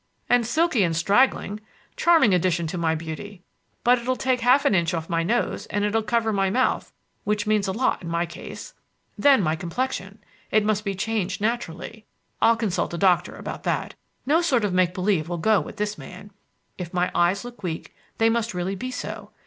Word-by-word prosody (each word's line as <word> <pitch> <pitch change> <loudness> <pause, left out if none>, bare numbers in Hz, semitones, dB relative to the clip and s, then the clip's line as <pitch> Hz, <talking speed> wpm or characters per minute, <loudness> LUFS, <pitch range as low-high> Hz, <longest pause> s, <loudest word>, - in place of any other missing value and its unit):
"And 245 -2 +3
silky 310 -2 +2
and 170 -3 +1
straggling. 205 +3 +2 0.4
Charming 325 - +4
addition 175 -1 +1
to 160 +3 -4
my 160 -1 +1
beauty. 170 +4 -7 0.4
But 245 +1 +4
it'll 255 +2 -1
take 255 -1 0
half 255 +4 +4
an 280 - +4
inch 170 -2 +1
off 165 +1 -5
my 165 0 +2
nose, 230 +9 -1
and 205 0 -1
it'll 215 +2 +1
cover 225 0 0
my 195 -1 +1
mouth, 255 +7 0 0.3
which 210 0 0
means 210 -1 +1
a - - 0
lot 250 +6 0
in 170 - -6
my 170 +1 0
case. 170 +2 -9 0.4
Then 275 -7 +5
my 155 -1 +1
complexion! 195 +3 -4 0.3
It 215 -1 +2
must 210 -1 +1
be 195 -1 -1
changed 200 -1 -2
naturally. 220 -1 -3 0.3
I'll 230 - +5
consult 200 -6 -1
a - - -4
doctor 180 -2 +2
about - - -7
that. - - -1 0.3
No 310 +6 +3
sort 255 -10 +2
of 195 - -1
make 180 -1 +2
believe 180 -4 0
will 175 - -2
go 210 +4 +3
with - - -9
this 210 0 -2
man. 195 +3 -11 0.5
If 180 0 -6
my 180 0 +1
eyes 180 +5 +2
look 240 -3 -10
weak, 165 -4 -5 0.2
they 225 - +4
must 230 -2 0
really 180 +2 -2
be 255 +7 -5
so. 255 - -6
205 Hz, 195 wpm, -24 LUFS, 180-235 Hz, 0.5 s, Then